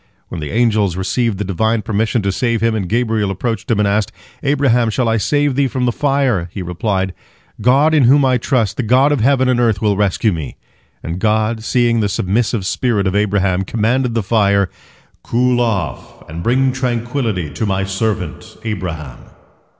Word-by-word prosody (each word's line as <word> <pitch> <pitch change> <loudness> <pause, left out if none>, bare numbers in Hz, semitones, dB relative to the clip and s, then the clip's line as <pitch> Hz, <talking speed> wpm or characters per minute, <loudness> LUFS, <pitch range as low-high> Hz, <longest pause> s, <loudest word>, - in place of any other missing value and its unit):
When 85 - -6
the 75 - -5
angels 110 -5 +1
received 100 +3 -1
the 105 - -2
Divine 110 +4 0
permission 110 +1 0
to 100 - 0
save 115 +3 0
him, 115 0 +2
and 100 -5 -3
Gabriel 110 -3 0
approached 115 +4 -3
him, 115 - +2
and 105 -1 +2
asked, 100 +1 0 0.3
"Abraham, 135 -5 +2
shall 120 +2 0
I 115 0 +2
save 145 +5 +1
thee 140 0 +2
from 130 0 -2
the 120 - +2
fire?" 135 -10 0
he 95 - -5
replied, 95 +1 -2 0.5
"God 135 +7 +4
in 150 -5 +4
whom 135 +3 +5
I 130 -1 +2
trust, 115 -5 0
the - - 0
God 130 +5 +3
of 145 - +1
heaven 130 +2 +3
and 125 -1 +2
earth, 115 -5 +2
will 105 -1 +1
rescue 100 +1 +1
me," 80 -5 -6 0.5
and 85 +3 -4
God, 110 +1 0
seeing 120 -1 +2
the 105 -2 0
submissive 100 +2 -1
spirit 105 0 0
of 95 +1 0
Abraham, 100 -3 +1
commanded 115 +5 0
the 115 - 0
fire, 100 -2 +2 0.5
"Cool 125 +1 +1
off 100 -9 -3
and 80 +2 -7
bring 130 +5 +2
tranquillity 120 - -2
to 105 - -3
my 95 0 0
servant 95 - -3
Abraham." 85 - -5
110 Hz, 180 wpm, -17 LUFS, 95-125 Hz, 0.5 s, whom